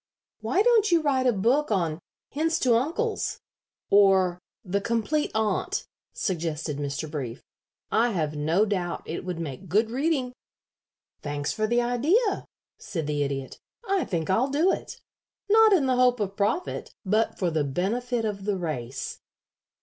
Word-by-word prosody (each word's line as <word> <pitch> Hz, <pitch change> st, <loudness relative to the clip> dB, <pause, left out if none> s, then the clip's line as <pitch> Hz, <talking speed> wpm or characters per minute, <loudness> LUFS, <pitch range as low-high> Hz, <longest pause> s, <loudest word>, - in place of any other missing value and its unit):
"Why 240 Hz, -, +1 dB
don't 450 Hz, -4 st, +4 dB
you 340 Hz, -, +5 dB
write 265 Hz, -3 st, +2 dB
a -, -, +5 dB
book 240 Hz, +8 st, +2 dB
on 170 Hz, -6 st, 0 dB, 0.3 s
'Hints 320 Hz, +3 st, +1 dB
to 250 Hz, -2 st, +4 dB
Uncles,' 335 Hz, -, 0 dB, 0.5 s
or 190 Hz, -3 st, +5 dB, 0.3 s
'The 200 Hz, +2 st, -1 dB
Complete 235 Hz, +8 st, 0 dB
Aunt,'" 220 Hz, -, 0 dB, 0.3 s
suggested 160 Hz, -5 st, -2 dB
Mr. 145 Hz, +2 st, -3 dB
Brief. 135 Hz, -5 st, -5 dB, 0.5 s
"I 235 Hz, +2 st, +3 dB
have 155 Hz, -8 st, -1 dB
no 160 Hz, +8 st, +2 dB
doubt 185 Hz, -4 st, -2 dB
it 165 Hz, -, -5 dB
would 180 Hz, -2 st, -4 dB
make 165 Hz, +3 st, -6 dB
good 220 Hz, +5 st, +2 dB
reading." 265 Hz, -1 st, 0 dB, 0.9 s
"Thanks 145 Hz, -1 st, -2 dB
for 215 Hz, -1 st, 0 dB
the 240 Hz, +2 st, +2 dB
idea," 315 Hz, -, +1 dB, 0.3 s
said 165 Hz, -5 st, -4 dB
the 145 Hz, 0 st, -1 dB
Idiot. 140 Hz, -1 st, -3 dB, 0.3 s
"I 390 Hz, -3 st, +2 dB
think 170 Hz, -1 st, -2 dB
I'll 240 Hz, +8 st, +2 dB
do 315 Hz, +7 st, +3 dB
it. -, -, -5 dB, 0.5 s
Not 440 Hz, +1 st, +6 dB
in 350 Hz, -9 st, +4 dB
the 255 Hz, -1 st, +2 dB
hope 250 Hz, -1 st, +4 dB
of 200 Hz, -2 st, -2 dB
profit, 215 Hz, -, -2 dB
but 215 Hz, +4 st, +1 dB
for 180 Hz, -3 st, 0 dB
the 155 Hz, -2 st, +1 dB
benefit 225 Hz, -, -1 dB
of 200 Hz, -2 st, -4 dB
the 205 Hz, -2 st, 0 dB
race." 135 Hz, -8 st, -4 dB
210 Hz, 155 wpm, -26 LUFS, 165-260 Hz, 0.9 s, Not